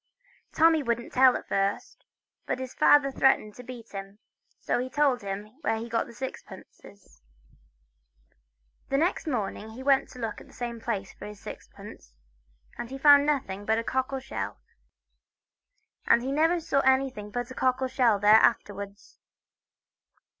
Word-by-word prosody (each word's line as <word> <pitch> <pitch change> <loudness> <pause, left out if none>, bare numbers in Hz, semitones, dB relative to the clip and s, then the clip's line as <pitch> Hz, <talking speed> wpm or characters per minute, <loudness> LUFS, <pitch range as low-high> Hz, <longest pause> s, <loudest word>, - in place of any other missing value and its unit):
Tommy 320 -1 +4
wouldn't 235 -2 -3
tell 260 0 +5
at - - -12
first, 195 +1 -2 0.4
but - - -1
his 260 -1 -7
father 280 -2 +4
threatened 265 -6 +2
to 250 - -11
beat 240 -2 -10
him, 195 0 -8 0.4
so - - -1
he 255 +1 -3
told 275 -3 +1
him 200 +3 -6
where 225 - 0
he 230 +1 -6
got 230 -1 -1
his 235 - -14
sixpences. 245 - -10 1.7
Next 320 +5 0
morning 220 -5 -3
he 235 +4 -9
went 275 0 +3
to - - -13
look 230 -3 -5
in - - -15
the - - -19
same 235 -2 -6
place 200 -5 -4
for - - -10
his 210 -1 -10
sixpence, - - -12 0.6
and 235 - -5
he 270 - -6
found 285 +1 +6
nothing 205 -10 -1
but 220 +2 +1
a 230 - -1
cockle 260 +2 -2
shell. 260 - -6 1.5
And 235 +1 +4
he 265 - -2
never 325 +4 +2
saw 295 -3 0
anything 265 -5 +1
but 245 +3 -4
a - - -6
cockle 255 0 0
shell 250 -4 +2
there 210 +2 +6
afterwards. 200 0 -2
245 Hz, 155 wpm, -27 LUFS, 210-270 Hz, 1.7 s, found